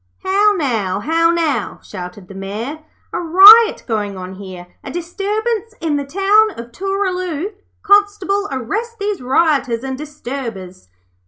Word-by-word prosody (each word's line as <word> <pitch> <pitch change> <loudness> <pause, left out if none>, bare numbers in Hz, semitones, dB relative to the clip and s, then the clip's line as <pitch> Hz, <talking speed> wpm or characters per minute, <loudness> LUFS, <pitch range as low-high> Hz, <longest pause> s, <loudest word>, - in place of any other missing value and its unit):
'How 405 +2 +3
now, 220 - -1
how 330 +7 +2
now!' 335 -4 -1
shouted 180 0 -9
the 195 - -11
Mayor. 210 +10 -6 0.3
'A - - -1
riot 395 +7 +7
going 205 -4 -2
on 185 0 -7
here, 185 -2 -10 0.2
a - - -7
disturbance 420 +6 -3
in 320 -3 -1
the 285 -1 -2
town 395 +8 +3
of 235 0 -9
Tooraloo. 370 - -2 0.3
Constable, 405 -1 +2
arrest 435 - -4
these 410 -4 -3
rioters 265 -3 +1
and 265 -1 -4
disturbers.' 245 - -7
315 Hz, 135 wpm, -17 LUFS, -, 0.3 s, riot